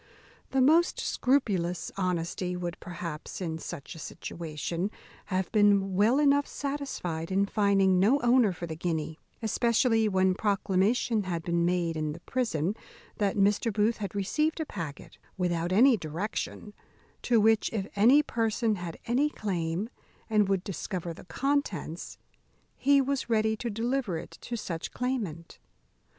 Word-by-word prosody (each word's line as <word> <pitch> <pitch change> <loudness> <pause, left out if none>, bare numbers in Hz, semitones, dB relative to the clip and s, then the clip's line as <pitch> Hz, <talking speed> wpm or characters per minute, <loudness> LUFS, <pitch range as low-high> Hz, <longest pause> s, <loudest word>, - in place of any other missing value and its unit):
The 265 - +2
most 330 +6 +4
scrupulous 195 - 0
honesty 180 -1 -1
would, 175 -1 -4
perhaps, 170 -3 -6
in 165 -3 -3
such 145 - -7
a 165 - -11
situation, 170 +3 -4 0.4
have 185 -1 -2
been 205 -3 +4
well 210 +7 +4
enough 285 -1 +4
satisfied 270 - -4
in 195 +1 +3
finding 200 -3 +3
no 230 +10 +4
owner 240 -3 +4
for 175 -1 -6
the 160 -1 -5
guinea; 160 -1 -3 0.2
especially 225 0 +2
when 190 -1 +3
proclamation 205 +2 +1
had 170 -3 -3
been 170 0 +1
made 175 -2 0
in 155 -1 -2
the - - -10
prison 205 - -1 0.5
that 205 -1 +1
Mr. 205 +3 +3
Booth 215 +3 +1
had 200 -2 -5
received 305 - 0
a 315 - -1
packet 165 - -7 0.2
without 175 -1 0
any 240 +5 +6
direction, 195 +5 -4 0.5
to 235 -2 +3
which, 220 0 +3
if 210 -4 -2
any 245 +9 +6
person 225 -3 0
had 175 -2 -6
any 265 +6 +2
claim, 185 - -2 0.4
and 210 -2 +3
would 190 -2 +1
discover 180 -2 -4
the - - -13
contents, 205 - -2 0.6
he 280 +1 +4
was 270 -1 -2
ready 220 -1 +2
to 235 +2 -4
deliver 230 -3 -1
it - - -8
to 240 - -5
such 165 -6 -5
claimant. 210 -11 -3
200 Hz, 145 wpm, -29 LUFS, 175-235 Hz, 0.6 s, any